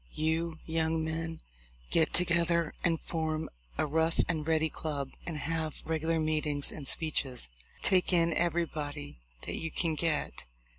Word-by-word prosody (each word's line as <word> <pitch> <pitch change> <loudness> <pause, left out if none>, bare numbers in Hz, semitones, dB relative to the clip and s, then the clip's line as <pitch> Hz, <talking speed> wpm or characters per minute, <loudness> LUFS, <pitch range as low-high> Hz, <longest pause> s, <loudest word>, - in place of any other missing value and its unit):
You 160 +1 0
young 160 0 0
men 165 0 -3 0.5
get 160 -1 +4
together 170 -2 +3
and 165 -2 +2
form 160 -1 -2 0.3
a - - +2
Rough 160 +2 +1
and 160 -3 -1
Ready 160 -1 +3
club, 145 -4 -4 0.2
and 165 -3 -2
have 160 0 -3
regular 160 0 +1
meetings 150 -2 +3
and 140 -3 -7
speeches. 135 - 0 0.3
Take 185 -1 +4
in 170 -2 +4
everybody 155 - -1 0.2
that - - -3
you 160 - -3
can 165 0 0
get 155 -1 -1
160 Hz, 140 wpm, -31 LUFS, 155-165 Hz, 0.5 s, get